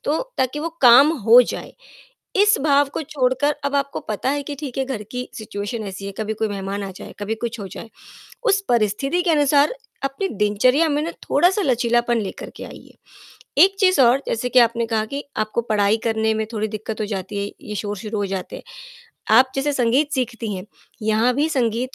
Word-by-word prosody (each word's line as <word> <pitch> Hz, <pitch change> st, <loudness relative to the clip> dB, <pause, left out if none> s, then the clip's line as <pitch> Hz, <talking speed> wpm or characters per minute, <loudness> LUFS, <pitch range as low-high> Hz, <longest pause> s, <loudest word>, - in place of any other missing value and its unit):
तो 300 Hz, +2 st, +1 dB, 0.2 s
ताकि 260 Hz, +3 st, 0 dB
वो 325 Hz, -, -2 dB
काम 250 Hz, +5 st, +8 dB, 0.2 s
हो 235 Hz, +2 st, +9 dB
जाए, -, -, -6 dB, 0.6 s
इस 415 Hz, +2 st, +4 dB
भाव 285 Hz, -1 st, +3 dB
को -, -, -2 dB
छोड़कर 280 Hz, 0 st, 0 dB
अब 280 Hz, 0 st, -1 dB
आपको 280 Hz, 0 st, -2 dB
पता 215 Hz, +5 st, -1 dB
है 285 Hz, 0 st, -1 dB
कि 285 Hz, +1 st, -6 dB
ठीक 275 Hz, -4 st, -6 dB
है 265 Hz, -, +1 dB
घर 260 Hz, -5 st, -4 dB
की 250 Hz, 0 st, -5 dB
सिचुएशन 215 Hz, +1 st, -5 dB
ऐसी 195 Hz, 0 st, -7 dB
है, 200 Hz, -, -5 dB
कभी 220 Hz, 0 st, -2 dB
कोई 220 Hz, 0 st, -1 dB
मेहमान 200 Hz, 0 st, -4 dB
आ 195 Hz, -, -5 dB
जाए, -, -, -10 dB
कभी 210 Hz, +2 st, -3 dB
कुछ 235 Hz, +1 st, -5 dB
हो 200 Hz, -, -5 dB
जाए, 225 Hz, -, -9 dB, 0.5 s
उस 420 Hz, -5 st, +3 dB
परिस्थिति 240 Hz, -, +1 dB
के 345 Hz, -, +1 dB
अनुसार 290 Hz, -, +3 dB, 0.3 s
अपनी 275 Hz, +9 st, -2 dB
दिनचर्या 240 Hz, -, +2 dB
में 290 Hz, 0 st, 0 dB
ना 335 Hz, -, -3 dB, 0.2 s
थोड़ा-सा 380 Hz, +4 st, +3 dB
लचीलापन 240 Hz, -4 st, +1 dB
लेकर 200 Hz, -, -6 dB
के -, -, -7 dB
आइए, -, -, -13 dB, 0.7 s
एक 390 Hz, +1 st, +3 dB
चीज़ 370 Hz, -6 st, +4 dB
और 250 Hz, +2 st, +4 dB
जैसे 245 Hz, +2 st, -1 dB
कि 255 Hz, -, +5 dB
आपने 235 Hz, -1 st, +3 dB
कहा 220 Hz, -1 st, -1 dB
कि 285 Hz, -, -3 dB
आपको 215 Hz, +2 st, -1 dB
पढ़ाई 215 Hz, -2 st, +1 dB
करने 220 Hz, 0 st, +1 dB
में 220 Hz, 0 st, -1 dB
थोड़ी 215 Hz, 0 st, -1 dB
दिक्कत 215 Hz, +1 st, -5 dB
हो -, -, -1 dB
जाती 200 Hz, 0 st, -4 dB
है, 205 Hz, -, -7 dB
ये 210 Hz, -, -7 dB
शोर 205 Hz, 0 st, -4 dB
शुरू 215 Hz, +1 st, -5 dB
हो 205 Hz, -, 0 dB
जाते 190 Hz, -1 st, -5 dB
हैं, -, -, -12 dB, 0.7 s
आप 260 Hz, +2 st, +6 dB
जैसे 275 Hz, +2 st, 0 dB
संगीत 270 Hz, +3 st, +1 dB
सीखती 230 Hz, -5 st, -3 dB
हैं, 185 Hz, -1 st, -6 dB, 0.4 s
यहाँ 220 Hz, +3 st, +2 dB
भी 295 Hz, +4 st, +1 dB
संगीत 250 Hz, -3 st, -1 dB
240 Hz, 205 wpm, -21 LUFS, 215-280 Hz, 0.7 s, हो